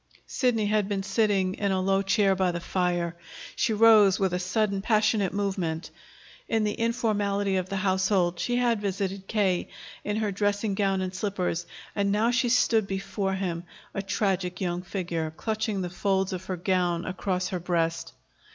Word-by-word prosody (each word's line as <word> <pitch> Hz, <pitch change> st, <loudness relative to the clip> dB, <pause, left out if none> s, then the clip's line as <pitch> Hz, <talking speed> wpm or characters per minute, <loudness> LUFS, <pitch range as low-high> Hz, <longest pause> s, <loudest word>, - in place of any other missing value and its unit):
Sidney 240 Hz, -5 st, +1 dB
had 210 Hz, -1 st, +1 dB
been 195 Hz, -1 st, -1 dB
sitting 200 Hz, -2 st, +1 dB
in 200 Hz, 0 st, -1 dB
a 190 Hz, -, +1 dB
low 195 Hz, +1 st, +2 dB
chair 195 Hz, 0 st, +3 dB
by 185 Hz, -1 st, +1 dB
the 170 Hz, -, -3 dB
fire. 175 Hz, -1 st, -1 dB, 0.4 s
She 245 Hz, -, +1 dB
rose 215 Hz, -3 st, +6 dB
with 190 Hz, -2 st, +1 dB
a 180 Hz, -, 0 dB
sudden 195 Hz, +2 st, 0 dB
passionate 215 Hz, -2 st, +2 dB
movement. 190 Hz, -5 st, -2 dB, 0.6 s
In 225 Hz, -1 st, +2 dB
the 210 Hz, -1 st, 0 dB
informality 205 Hz, -4 st, 0 dB
of 185 Hz, 0 st, -2 dB
the 195 Hz, -, -3 dB
household, 190 Hz, -2 st, +1 dB
she 245 Hz, -, 0 dB
had 240 Hz, -3 st, +2 dB
visited 195 Hz, -1 st, -3 dB
K. 195 Hz, -5 st, +1 dB, 0.4 s
in 210 Hz, -, -2 dB
her 215 Hz, -2 st, 0 dB
dressing 205 Hz, +1 st, 0 dB
gown 195 Hz, -1 st, +1 dB
and 185 Hz, 0 st, -3 dB
slippers; 185 Hz, -3 st, -2 dB, 0.3 s
and 200 Hz, -1 st, +1 dB
now 220 Hz, +4 st, +2 dB
she 245 Hz, 0 st, +1 dB
stood 225 Hz, -3 st, +3 dB
before 195 Hz, 0 st, -2 dB
him, 175 Hz, -3 st, -3 dB, 0.3 s
a 195 Hz, -, -2 dB
tragic 190 Hz, -2 st, -1 dB
young 175 Hz, -2 st, -1 dB
figure, 175 Hz, -4 st, -3 dB
clutching 220 Hz, -2 st, -2 dB
the 180 Hz, -, -3 dB
folds 190 Hz, 0 st, 0 dB
of 185 Hz, 0 st, -5 dB
her 185 Hz, -, -3 dB
gown 175 Hz, -1 st, 0 dB
across 185 Hz, -1 st, -2 dB
her 180 Hz, -, -2 dB
breast. 165 Hz, -1 st, -1 dB
195 Hz, 170 wpm, -27 LUFS, 185-210 Hz, 0.6 s, rose